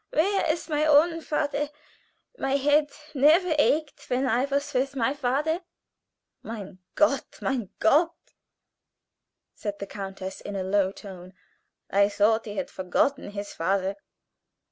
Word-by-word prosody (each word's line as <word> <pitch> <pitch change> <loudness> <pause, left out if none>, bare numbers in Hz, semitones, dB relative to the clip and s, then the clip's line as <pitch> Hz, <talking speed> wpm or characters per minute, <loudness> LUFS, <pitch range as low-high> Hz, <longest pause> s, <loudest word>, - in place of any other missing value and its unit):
Where 385 +1 +2
is 330 - -4
my 305 -2 0
own 315 +2 +4
father? 295 -2 -1 0.7
My 270 - -1
head 290 +2 +3 0.2
never 315 +5 +4
ached 300 0 +1
when 255 +2 +1
I 255 +1 +2
was 280 +1 -2
with 270 +2 0
my 265 +1 +1
father." 290 +5 0 0.8
"Mein 200 -4 -8 0.2
Gott! 280 -3 +1
mein 245 -7 -2
Gott!" 315 +9 +3 1.4
said 205 -1 -5
the 200 - -5
countess 195 -1 -7
in 205 - -6
a 190 - -2
low 190 0 +2
tone. 185 -2 -11 0.6
"I 200 +1 +4
thought 215 +2 +2
he 210 -1 -6
had - - -3
forgotten 200 +9 0
his 205 0 -6
father." 190 +3 0
265 Hz, 135 wpm, -26 LUFS, 200-295 Hz, 1.4 s, own